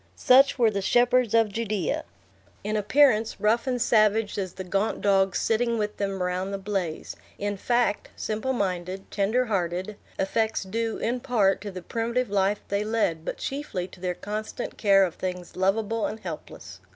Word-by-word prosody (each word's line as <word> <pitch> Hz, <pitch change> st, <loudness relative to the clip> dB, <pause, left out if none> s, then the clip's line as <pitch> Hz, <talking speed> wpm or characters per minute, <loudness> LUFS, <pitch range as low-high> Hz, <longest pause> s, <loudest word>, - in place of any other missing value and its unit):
Such 270 Hz, +2 st, +5 dB
were 230 Hz, -3 st, +4 dB
the 200 Hz, -1 st, -2 dB
shepherds 245 Hz, +2 st, +3 dB
of 225 Hz, -2 st, +4 dB
Judea! 215 Hz, -2 st, -2 dB, 0.6 s
In 210 Hz, +1 st, -2 dB
appearance, 225 Hz, +1 st, +3 dB
rough 225 Hz, +5 st, +2 dB
and 250 Hz, -1 st, 0 dB
savage 215 Hz, -2 st, +3 dB
as 185 Hz, -2 st, -3 dB
the 190 Hz, -, -6 dB
gaunt 195 Hz, +4 st, -1 dB
dogs 195 Hz, -2 st, +3 dB
sitting 230 Hz, +1 st, +1 dB
with 210 Hz, -1 st, -2 dB
them 195 Hz, -2 st, -2 dB
around 180 Hz, +1 st, -1 dB
the 200 Hz, -, -3 dB
blaze; 190 Hz, -5 st, -3 dB, 0.2 s
in 205 Hz, 0 st, -2 dB
fact, 240 Hz, +1 st, 0 dB
simple 220 Hz, +5 st, -2 dB
minded, 190 Hz, -4 st, -3 dB
tender 220 Hz, +5 st, +1 dB
hearted; 190 Hz, -1 st, -2 dB, 0.2 s
effects 220 Hz, +3 st, 0 dB
due, 225 Hz, +4 st, -2 dB
in 240 Hz, +2 st, -1 dB
part, 225 Hz, -8 st, +2 dB
to 205 Hz, -, -5 dB
the 185 Hz, -2 st, -8 dB
primitive 235 Hz, +3 st, -1 dB
life 200 Hz, +1 st, +1 dB
they 200 Hz, +1 st, 0 dB
led, 210 Hz, -7 st, 0 dB
but -, -, -4 dB
chiefly 270 Hz, -10 st, -4 dB
to 180 Hz, -, -15 dB
their 180 Hz, -1 st, -2 dB
constant 215 Hz, +5 st, -5 dB
care 195 Hz, -2 st, +5 dB
of 175 Hz, -, -4 dB
things 180 Hz, -1 st, -5 dB
lovable 215 Hz, +4 st, +1 dB
and 220 Hz, -, -7 dB
helpless. 100 Hz, -, -8 dB
210 Hz, 170 wpm, -26 LUFS, 190-230 Hz, 0.6 s, Such